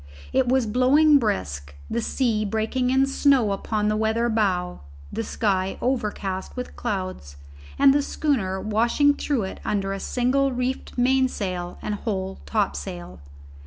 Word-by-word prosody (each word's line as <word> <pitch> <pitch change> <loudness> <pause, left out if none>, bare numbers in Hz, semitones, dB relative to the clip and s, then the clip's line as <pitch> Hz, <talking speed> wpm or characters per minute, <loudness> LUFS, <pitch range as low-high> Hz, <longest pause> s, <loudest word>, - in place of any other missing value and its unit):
It 260 -2 +2
was 260 -1 +3
blowing 280 +6 +5
brisk, 75 - -3
the 235 - -2
sea 225 -3 0
breaking 220 +5 -1
in 265 +1 +4
snow 275 -5 +3
upon 210 +2 -1
the 215 - +1
weather 220 +2 +1
bow, 185 -5 0 0.3
the - - -2
sky 195 -4 -1
overcast 210 -6 -2
with 250 0 -6
clouds, 185 - -4 0.4
and 275 -1 +6
the 290 - +3
schooner 230 -11 -1
washing 235 +8 +2
through 285 -5 -1
it 190 - -6
under 195 -1 -1
a 195 - -4
single 265 +5 +1
reefed 250 +1 -3
mainsail 245 -9 0
and 210 - -2
whole 195 -3 -3
topsail. 85 +6 -3
220 Hz, 140 wpm, -24 LUFS, 190-260 Hz, 0.4 s, and